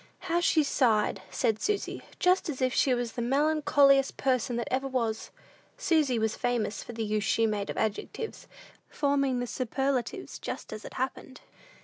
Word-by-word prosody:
"How 345 -2 0
she 325 -2 +3
sighed," 230 -7 +2
said 225 -4 0
Susy, 420 -1 -1 0.2
"just 365 -1 +2
as 275 - -4
if 255 -1 +1
she 260 -3 +3
was 240 -1 -2
the 240 - -4
melancholiest 280 +1 +3
person 255 -3 0
that 235 -1 -2
ever 265 +1 0
was!" 230 -4 -2 0.5
Susy 315 - +2
was 220 -1 0
famous 240 -3 -1
for - - -8
the 225 -1 -3
use 210 0 0
she 225 - +2
made 210 -2 -1
of - - -4
adjectives, 220 - -3 0.4
forming 275 -3 +1
the 245 - -1
superlatives 270 - -2
just - - -6
as 215 - -7
it - - -9
happened. 260 0 -4
255 Hz, 165 wpm, -29 LUFS, 230-285 Hz, 0.5 s, she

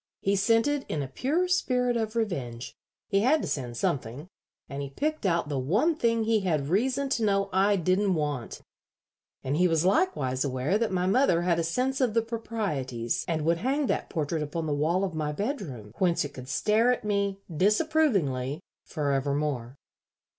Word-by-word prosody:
He 200 +1 +1
sent 225 +5 +3
it 290 -1 0
in 145 - -1
a - - -5
pure 290 - 0
spirit 250 -9 +1
of 220 -1 -2
revenge. 130 - -3 0.4
He 195 - +3
had 265 +9 +3
to - - -2
send 120 -4 -3
something, 130 +7 -2 0.4
and 140 0 -5
he 140 - -5
picked 300 - -2
out 170 -3 +1
the 145 -2 -2
one 205 - +2
thing 230 -5 +1
he 220 0 +2
had 155 -7 -1
reason 255 - +1
to 235 -4 0
know 195 -1 +1
I 195 +2 +4
didn't 185 +2 +1
want; 145 -6 -3 0.8
and 135 +2 -1
he 180 +1 +4
was 165 0 +1
likewise 165 - +1
aware 140 +8 0
that 230 -3 0
my 180 -1 0
mother 190 -4 +3
had 170 -1 +2
a - - +1
sense 255 +11 -1
of 240 -4 +1
the 230 - +3
proprieties 175 - -3
and 160 -2 -1
would 170 +1 +3
hang 275 - 0
that - - -1
portrait 160 -1 -2
upon 155 +2 -3
the 150 - -1
wall 160 +6 +1
of 190 -3 -2
my 155 -1 -2
bedroom, 150 - -4
whence 175 -5 +2
it 145 - -8
could 130 -2 -9
stare 220 - +3
at 250 - -1
me, 200 -1 0 0.2
disapprovingly, 195 - +1 0.2
forevermore. 140 -3 -1
185 Hz, 185 wpm, -27 LUFS, 145-230 Hz, 0.8 s, I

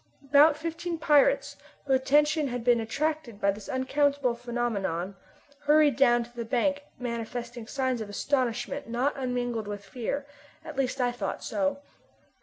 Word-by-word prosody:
About 290 +2 +6
fifteen 330 +2 -4
pirates, 305 - +3 0.3
whose 270 -2 +3
attention 295 +3 +3
had 245 -2 -4
been 240 -1 +4
attracted 275 0 -2
by 200 - +3
this 200 0 -9
unaccountable 275 0 +1
phenomenon, 220 -7 -2 0.5
hurried 300 -1 +5
down 240 -3 +4
to 240 +1 -16
the 235 - -3
bank 270 +5 0 0.2
manifesting 235 -1 -5
signs 260 -2 -1
of 210 - -6
astonishment 255 +3 -1
not 250 +5 +1
unmingled 245 -4 -2
with 205 -1 -6
fear 255 +6 -3 0.4
at 310 -2 -7
least 265 -1 -1
I 245 -1 +2
thought 245 - -4
so. 285 -1 -1
255 Hz, 145 wpm, -28 LUFS, 235-285 Hz, 0.5 s, About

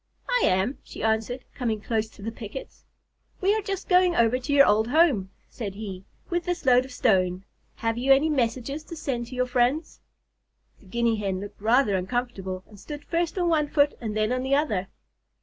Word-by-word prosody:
"I - - +2
am," 190 +9 +1
she - - -9
answered, 220 +3 0
coming 230 -4 -2
close 220 0 -1
to 200 - -14
the 225 - -3
pickets. 225 +3 -9 0.5
"We 390 +2 +3
are 435 - 0
just 390 -2 -4
going 360 -1 +4
over 235 +2 +3
to 260 +3 -5
your 280 -1 +7
old 220 +2 +3
home," 255 - +3 0.2
said 205 -5 -6
he, 195 -3 -7 0.2
"with 345 -1 -2
this 355 -3 -3
load 250 0 +5
of 265 - -12
stone. 185 -6 +1 0.3
Have 225 +1 -1
you 265 +2 +2
any 275 +3 +6
messages 265 +1 -1
to 335 - -8
send 245 -6 -3
to 255 - -8
your 250 0 +1
friends?" 250 +5 0 0.8
The 195 - -20
Guinea 235 +2 +1
Hen 195 -3 -2
looked 205 0 -9
rather 225 -1 +3
uncomfortable, 190 -2 -3
and 210 -2 -15
stood 295 +6 -8
first 340 +1 -1
on 355 -1 +1
one 310 -3 +2
foot 290 0 +3
and 215 -2 -3
then 215 +2 +1
the 265 +1 +2
other. 215 -11 0
245 Hz, 195 wpm, -26 LUFS, 215-290 Hz, 0.8 s, your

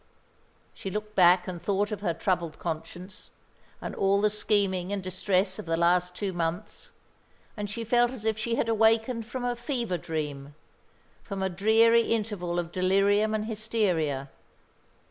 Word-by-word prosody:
She 195 - -6
looked 210 +2 -5
back 180 -1 +5
and 175 -2 -5
thought 200 +3 0
of 205 -2 -4
her 170 -5 -1
troubled 170 -3 -1
conscience, 175 +3 -6 0.5
and - - -6
all 195 +1 +2
the 210 0 +2
scheming 200 -3 +1
and 200 -2 -2
distress 185 +1 0
of - - -7
the 165 0 0
last 180 +1 +2
two 195 -1 -3
months, 170 0 -4 0.7
and 205 -1 -4
she 230 +3 -4
felt 240 +2 +3
as 245 -4 -8
if 220 -1 +2
she 230 +2 -1
had 230 - 0
awakened 225 +1 +2
from 245 +1 -4
a 245 0 0
fever 240 - -2
dream, 145 -3 -5 0.7
from 195 -2 -5
a 190 - +1
dreary 220 +5 +4
interval 205 -7 -2
of 170 -1 -2
delirium 200 +4 +2
and 215 0 -2
hysteria. 190 -11 -1
200 Hz, 160 wpm, -27 LUFS, 175-220 Hz, 0.7 s, back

